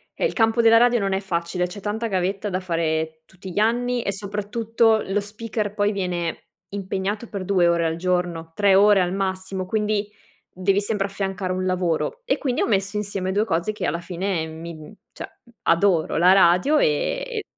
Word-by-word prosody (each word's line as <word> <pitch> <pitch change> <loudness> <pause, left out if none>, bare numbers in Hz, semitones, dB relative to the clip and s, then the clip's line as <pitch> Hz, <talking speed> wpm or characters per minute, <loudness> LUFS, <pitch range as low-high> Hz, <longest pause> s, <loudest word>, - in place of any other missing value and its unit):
eh, - - -1
il - - 0
campo 225 0 +3
della 230 0 +7
radio 240 +1 +4
non 195 -2 -1
è 190 - +1
facile. 180 -1 -2
C'è 200 +3 -9
tanta 215 +3 -2
gavetta 195 +1 -1
da 185 -1 -1
fare 160 -3 -2
tutti 190 +1 -11
gli 190 - -2
anni 240 +3 +1
e - - -1
soprattutto 215 +3 0
lo 195 +2 0
speaker 210 0 -4
poi 205 0 +2
viene 180 -4 -3 0.2
impegnato 200 +3 -3
per 195 -2 -5
2 180 -2 +3
ore 170 -1 +2
al 160 0 0
giorno, 175 -2 -2
3 200 -2 +4
ore 205 +1 +6
al 180 0 0
massimo 190 -1 -3
quindi 210 0 -1 0.4
devi 195 +2 +1
sempre 205 -1 -1
affiancare 195 -1 -3
un 185 0 -2
lavoro. 185 - -1
E - - 0
quindi 255 -3 -1
ho - - +1
messo 200 -1 0
insieme 195 -2 -3
2 205 +3 +1
cose 170 0 0
che 215 - -4
alla 165 +3 -1
fine 180 -2 -2
mi 165 +1 -8
mhmm, 155 +4 -12 0.2
cioè - - -9 0.3
adoro 170 -1 +2
la 180 +3 +6
radio 190 - +4
e 455 - 0
195 Hz, 190 wpm, -23 LUFS, 180-210 Hz, 0.4 s, della